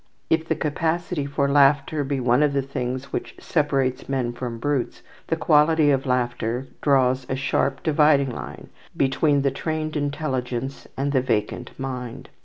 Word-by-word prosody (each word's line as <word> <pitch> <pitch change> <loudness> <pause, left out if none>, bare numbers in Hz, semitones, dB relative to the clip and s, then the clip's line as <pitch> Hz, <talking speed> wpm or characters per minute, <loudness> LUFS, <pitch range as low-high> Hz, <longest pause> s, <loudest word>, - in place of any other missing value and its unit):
If 160 0 +2
the - - +1
capacity 160 0 -1
for 140 0 0
laughter 140 +1 +3
be 140 0 -2
one 125 +2 +3
of 150 -1 +3
the 140 -1 +1
things 130 0 -4
which - - -4
separates 135 -5 0
men 125 -3 -1
from 120 -1 -5
brutes, 140 +1 -2 0.2
the - - +1
quality 150 0 +4
of 135 0 0
laughter 125 0 -1 0.2
draws 130 -2 +2
a 130 - 0
sharp 135 0 0
dividing 150 -3 +3
line - - -8 0.3
between 140 +1 +2
the 140 - +2
trained 155 +2 -3
intelligence 135 -3 -3
and 140 +1 0
the 130 -2 +2
vacant 110 -5 -2
mind. 130 -1 -5
135 Hz, 155 wpm, -23 LUFS, 130-150 Hz, 0.3 s, quality